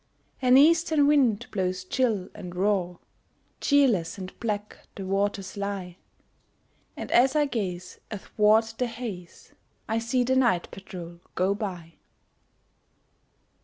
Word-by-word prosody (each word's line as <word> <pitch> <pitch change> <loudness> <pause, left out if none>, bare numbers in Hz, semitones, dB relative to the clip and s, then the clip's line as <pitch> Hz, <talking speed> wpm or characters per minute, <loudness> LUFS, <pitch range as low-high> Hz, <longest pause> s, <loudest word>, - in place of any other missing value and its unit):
An 255 0 +6
eastern 320 0 +5
wind 255 -7 +3
blows 185 -2 -2
chill 215 -2 0
and 180 0 -9
raw, 185 -2 0 0.6
Cheerless 230 - +2
and 185 -1 -7
black 210 -2 -3 0.2
the 195 - -6
waters 195 0 -1
lie, 200 -3 -4 1.0
And - - -6
as 265 +4 +4
I 300 -1 +4
gaze 185 -9 -4
athwart 215 +1 +2
the 250 - +1
haze, 225 -7 -8 0.3
I 225 +1 0
see 245 +2 0
the 260 +2 +1
night 240 -10 +2
patrol 175 -3 -9 0.2
go 185 +2 +2
by. 180 -5 -6
205 Hz, 120 wpm, -26 LUFS, 185-245 Hz, 1.0 s, An